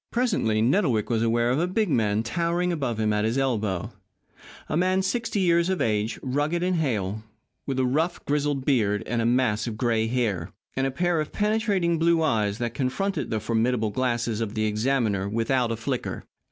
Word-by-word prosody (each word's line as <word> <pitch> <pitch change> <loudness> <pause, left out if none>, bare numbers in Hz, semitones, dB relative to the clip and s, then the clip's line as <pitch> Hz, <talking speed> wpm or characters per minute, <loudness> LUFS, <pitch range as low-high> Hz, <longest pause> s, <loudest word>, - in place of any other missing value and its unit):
Presently 195 - +1
Nettlewick 125 - +2
was 115 -1 +1
aware 120 +1 +2
of 130 - +1
a 175 - +1
big 210 +4 0
man 110 - +1
towering 170 +7 0
above 135 -8 -2
him 110 -1 +1
at 105 0 +1
his 115 +4 0
elbow 110 -9 -1 0.8
a - - -2
man 185 +3 +2
sixty 230 +1 -1
years 170 -1 +3
of 190 - 0
age, 105 0 0
rugged 145 +6 0
and 180 -1 +1
hale, 110 - -1 0.5
with 135 -2 -2
a 130 - +2
rough, 160 +7 -1
grizzled 145 -2 0
beard, 105 -7 +2
a 115 0 0
mass 120 -3 +1
of 110 -2 -4
gray 115 -2 +1
hair, 105 -8 -1 0.2
and 135 0 +1
a - - 0
pair 175 +2 +1
of 155 - -5
penetrating 205 -6 +1
blue 165 0 +3
eyes 105 -8 +1
that 120 -1 -3
confronted 190 +11 -2
the 110 - -1
formidable 115 -1 0
glasses 120 -1 -1
of 110 -1 -3
the 110 0 0
examiner 110 -3 0
without 115 +2 0
a - - 0
flicker. 115 - -3
125 Hz, 185 wpm, -25 LUFS, 110-170 Hz, 0.8 s, years